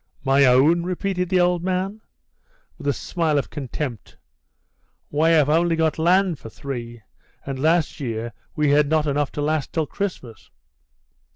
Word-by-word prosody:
"My 135 Hz, 0 st, +4 dB
own?" 135 Hz, +7 st, +5 dB
repeated 180 Hz, 0 st, -2 dB
the 185 Hz, -1 st, +3 dB
old 175 Hz, -1 st, +2 dB
man, 190 Hz, +3 st, -2 dB, 0.8 s
with 145 Hz, -, -6 dB
a -, -, +4 dB
smile 160 Hz, +2 st, -1 dB
of 140 Hz, -, -2 dB
contempt; 135 Hz, -4 st, -6 dB, 0.9 s
"why 155 Hz, +3 st, +1 dB
I -, -, +5 dB
have 150 Hz, -4 st, +4 dB
only 165 Hz, +2 st, +2 dB
got 160 Hz, -1 st, 0 dB
land 180 Hz, 0 st, +2 dB
for 115 Hz, -, -10 dB
three, 120 Hz, -3 st, -7 dB, 0.4 s
and 135 Hz, -1 st, -5 dB
last 160 Hz, +2 st, +1 dB
year 115 Hz, -3 st, -4 dB, 0.2 s
we 150 Hz, -1 st, +2 dB
had 145 Hz, 0 st, +3 dB
not 155 Hz, -1 st, +2 dB
enough 145 Hz, -1 st, 0 dB
to 145 Hz, -, -3 dB
last 155 Hz, -1 st, -1 dB
till 160 Hz, -2 st, 0 dB
Christmas." 145 Hz, -, -6 dB
150 Hz, 160 wpm, -22 LUFS, 140-175 Hz, 0.9 s, own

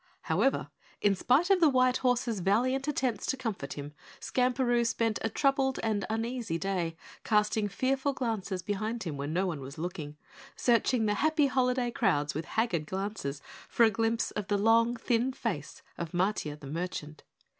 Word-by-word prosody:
However, 205 Hz, +12 st, +1 dB, 0.3 s
in 205 Hz, -, +3 dB
spite 275 Hz, -, +2 dB
of 385 Hz, -, +5 dB
the 325 Hz, -3 st, +6 dB
white 255 Hz, -1 st, +3 dB
horse's 245 Hz, -4 st, 0 dB
valiant 255 Hz, -, +1 dB
attempts 260 Hz, -5 st, -1 dB
to 265 Hz, -, 0 dB
comfort 210 Hz, -, -4 dB
him, 145 Hz, 0 st, -7 dB, 0.3 s
Skamperoo 250 Hz, -1 st, +1 dB
spent 230 Hz, -1 st, 0 dB
a 225 Hz, -, 0 dB
troubled 270 Hz, +2 st, +1 dB
and 215 Hz, -3 st, 0 dB
uneasy 225 Hz, -4 st, -2 dB
day, 175 Hz, -3 st, -2 dB, 0.3 s
casting 210 Hz, 0 st, +2 dB
fearful 265 Hz, +7 st, 0 dB
glances 215 Hz, -7 st, -3 dB
behind 215 Hz, +4 st, -2 dB
him 160 Hz, -5 st, -4 dB
when 140 Hz, +2 st, -4 dB
no 180 Hz, +4 st, +1 dB
one 165 Hz, -6 st, -3 dB
was 135 Hz, +2 st, -9 dB
looking, 155 Hz, -3 st, -5 dB, 0.4 s
searching 235 Hz, -1 st, +2 dB
the 210 Hz, -, +2 dB
happy 310 Hz, +5 st, +2 dB
holiday 250 Hz, -2 st, +1 dB
crowds 150 Hz, -, +1 dB
with 155 Hz, +2 st, -4 dB
haggard 180 Hz, -10 st, -1 dB
glances 190 Hz, -8 st, -4 dB, 0.3 s
for 235 Hz, -, +3 dB
a 225 Hz, -, +6 dB
glimpse 225 Hz, +2 st, 0 dB
of 205 Hz, -2 st, -4 dB
the 205 Hz, -, +1 dB
long, 230 Hz, +3 st, +4 dB
thin 240 Hz, +2 st, 0 dB
face -, -, -4 dB, 0.2 s
of 170 Hz, -2 st, -5 dB
Matiah 175 Hz, -5 st, -1 dB
the 145 Hz, -, -11 dB
merchant. 155 Hz, 0 st, -5 dB
220 Hz, 165 wpm, -30 LUFS, 180-250 Hz, 0.4 s, the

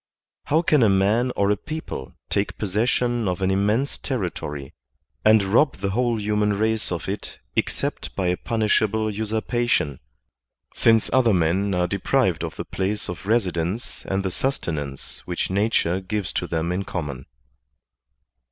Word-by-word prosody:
How 155 Hz, +4 st, +2 dB
can 150 Hz, -4 st, +4 dB
a 110 Hz, -, +6 dB
man 105 Hz, +6 st, +3 dB
or 100 Hz, 0 st, +2 dB
a -, -, +3 dB
people 155 Hz, -, -6 dB, 0.2 s
take 100 Hz, 0 st, 0 dB
possession 115 Hz, +3 st, +1 dB
of 90 Hz, 0 st, -1 dB
an 95 Hz, 0 st, +1 dB
immense 105 Hz, +8 st, +1 dB
territory 85 Hz, -, -4 dB, 0.5 s
and 110 Hz, -1 st, +6 dB
rob 120 Hz, +10 st, +3 dB
the 100 Hz, 0 st, -2 dB
whole 120 Hz, +1 st, +1 dB
human 105 Hz, 0 st, +1 dB
race 110 Hz, +1 st, 0 dB
of 85 Hz, -, -3 dB
it 100 Hz, +2 st, -5 dB, 0.2 s
except -, -, -2 dB
by 95 Hz, -, -1 dB
a 90 Hz, -, +2 dB
punishable 110 Hz, 0 st, +1 dB
usurpation, 110 Hz, -, 0 dB, 0.7 s
since 115 Hz, -1 st, +3 dB
other 120 Hz, -6 st, +5 dB
men 90 Hz, +4 st, +1 dB
are 90 Hz, 0 st, +2 dB
deprived 100 Hz, +2 st, +1 dB
of -, -, -4 dB
the -, -, -5 dB
place 100 Hz, +2 st, -2 dB
of 90 Hz, +2 st, -6 dB
residence 95 Hz, -2 st, -1 dB
and 95 Hz, 0 st, 0 dB
the 95 Hz, -, 0 dB
sustenance 80 Hz, -, -3 dB
which 90 Hz, +1 st, -2 dB
nature 95 Hz, -3 st, +2 dB
gives 100 Hz, 0 st, -3 dB
to 90 Hz, -, -1 dB
them 85 Hz, 0 st, -1 dB
in 90 Hz, +2 st, -1 dB
common. 75 Hz, -9 st, -5 dB
100 Hz, 150 wpm, -24 LUFS, 90-110 Hz, 0.7 s, a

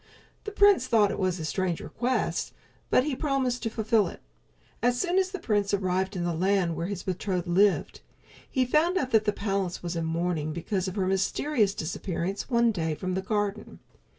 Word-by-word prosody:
The 420 Hz, -, -4 dB
prince 405 Hz, -10 st, +5 dB
thought 215 Hz, -4 st, +4 dB
it -, -, -4 dB
a 185 Hz, -4 st, -1 dB
strange 180 Hz, +1 st, -1 dB
request, 250 Hz, +2 st, -2 dB, 0.4 s
but 255 Hz, -, +4 dB
he 285 Hz, -1 st, -2 dB
promised 270 Hz, -4 st, 0 dB
to 225 Hz, -, -1 dB
fulfill 220 Hz, -1 st, +2 dB
it. -, -, -9 dB, 0.6 s
As 245 Hz, +1 st, +2 dB
soon 370 Hz, 0 st, +2 dB
as 380 Hz, 0 st, +1 dB
the 385 Hz, -, -5 dB
prince 205 Hz, -, +1 dB
arrived 190 Hz, 0 st, -1 dB
in 175 Hz, -, -2 dB
the 175 Hz, -1 st, 0 dB
land 180 Hz, 0 st, +1 dB
where 165 Hz, +2 st, -3 dB
his 200 Hz, -2 st, -5 dB
betrothed 185 Hz, -1 st, -2 dB
lived, 190 Hz, +3 st, +2 dB, 0.5 s
he 260 Hz, -1 st, +1 dB
found 315 Hz, +8 st, +2 dB
out 260 Hz, -6 st, -1 dB
that 220 Hz, -1 st, +4 dB
the 210 Hz, -, +3 dB
palace 195 Hz, -4 st, -2 dB
was 170 Hz, 0 st, -3 dB
in 165 Hz, -1 st, -1 dB
mourning 165 Hz, -2 st, -1 dB
because 185 Hz, +3 st, -2 dB
of 185 Hz, -, -4 dB
her 195 Hz, -3 st, 0 dB
mysterious 200 Hz, +3 st, +1 dB
disappearance 180 Hz, +5 st, -3 dB
one 235 Hz, -2 st, +3 dB
day 160 Hz, -6 st, -2 dB
from 185 Hz, +3 st, -3 dB
the 190 Hz, -, -1 dB
garden. 205 Hz, +1 st, -2 dB
200 Hz, 190 wpm, -27 LUFS, 180-245 Hz, 0.6 s, prince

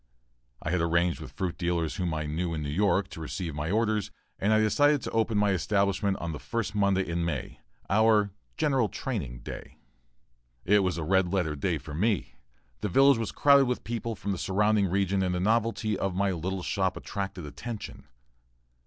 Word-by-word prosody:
I 75 Hz, -, -2 dB
had 90 Hz, -1 st, +1 dB
arranged 85 Hz, +1 st, +1 dB
with 65 Hz, -, -8 dB
fruit 90 Hz, 0 st, -3 dB
dealers 85 Hz, -2 st, -1 dB
whom 90 Hz, -2 st, -1 dB
I 80 Hz, 0 st, -2 dB
knew 85 Hz, +3 st, -2 dB
in 75 Hz, -, -3 dB
New 70 Hz, -, -3 dB
York, 95 Hz, +2 st, +2 dB
to 80 Hz, -, -9 dB
receive 80 Hz, +1 st, -4 dB
my 75 Hz, +2 st, -3 dB
orders, 105 Hz, 0 st, +1 dB, 0.3 s
and 100 Hz, -, +1 dB
I 110 Hz, -, +5 dB
decided 145 Hz, +6 st, +3 dB
to -, -, -4 dB
open 110 Hz, -1 st, +1 dB
my 105 Hz, -1 st, +3 dB
establishment 100 Hz, +1 st, +1 dB
on 85 Hz, -, -4 dB
the 75 Hz, -, -6 dB
first 115 Hz, -3 st, -3 dB
Monday 100 Hz, -2 st, +2 dB
in 85 Hz, 0 st, -1 dB
May 80 Hz, -6 st, -4 dB, 0.3 s
our 105 Hz, -1 st, +4 dB, 0.3 s
"general 135 Hz, -8 st, +2 dB
training" 70 Hz, -, -4 dB
day. -, -, -9 dB, 0.9 s
It 105 Hz, +2 st, +5 dB
was 95 Hz, -3 st, 0 dB
a 85 Hz, -, -2 dB
"red 95 Hz, +1 st, +2 dB
letter" 90 Hz, -6 st, 0 dB
day 85 Hz, +3 st, -1 dB
for 75 Hz, +1 st, -9 dB
me. 100 Hz, -, 0 dB, 0.5 s
The 105 Hz, -, -2 dB
village 135 Hz, +5 st, +5 dB
was 115 Hz, -, -2 dB
crowded 140 Hz, -1 st, +5 dB
with 125 Hz, 0 st, -2 dB
people 115 Hz, -1 st, -3 dB
from 100 Hz, +1 st, -4 dB
the 95 Hz, -, -3 dB
surrounding 105 Hz, +1 st, +2 dB
region 95 Hz, +1 st, +1 dB
and 90 Hz, -1 st, 0 dB
the -, -, -1 dB
novelty 110 Hz, +1 st, +1 dB
of 95 Hz, -2 st, -1 dB
my 100 Hz, +1 st, +1 dB
little 90 Hz, +2 st, -3 dB
shop 95 Hz, 0 st, 0 dB
attracted 95 Hz, -4 st, -5 dB
attention. 110 Hz, +9 st, -7 dB
95 Hz, 190 wpm, -28 LUFS, 85-110 Hz, 0.9 s, I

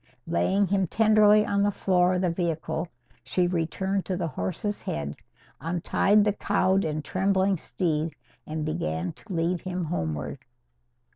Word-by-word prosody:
Laying 190 Hz, +4 st, +2 dB
him 195 Hz, 0 st, +1 dB
tenderly 215 Hz, +1 st, +5 dB
on 200 Hz, 0 st, +1 dB
the 205 Hz, -, +3 dB
floor 185 Hz, -2 st, +2 dB
of 180 Hz, -, 0 dB
the 180 Hz, -2 st, +1 dB
vehicle, 170 Hz, 0 st, -2 dB, 0.4 s
she 180 Hz, -, +1 dB
returned 180 Hz, +3 st, -1 dB
to 185 Hz, -, -1 dB
the 170 Hz, -2 st, -2 dB
horse's 205 Hz, +6 st, -3 dB
head, 75 Hz, 0 st, -4 dB, 0.4 s
untied 180 Hz, +5 st, +2 dB
the 210 Hz, -1 st, +2 dB
cowed 195 Hz, -1 st, +1 dB
and 155 Hz, -1 st, -3 dB
trembling 190 Hz, +1 st, +2 dB
steed, 160 Hz, -2 st, -2 dB, 0.3 s
and 155 Hz, 0 st, -3 dB
began 80 Hz, -, -2 dB
to 225 Hz, -, -13 dB
lead 170 Hz, 0 st, 0 dB
him 185 Hz, -1 st, -3 dB
homeward. 80 Hz, -, -3 dB
180 Hz, 145 wpm, -26 LUFS, 160-195 Hz, 0.4 s, tenderly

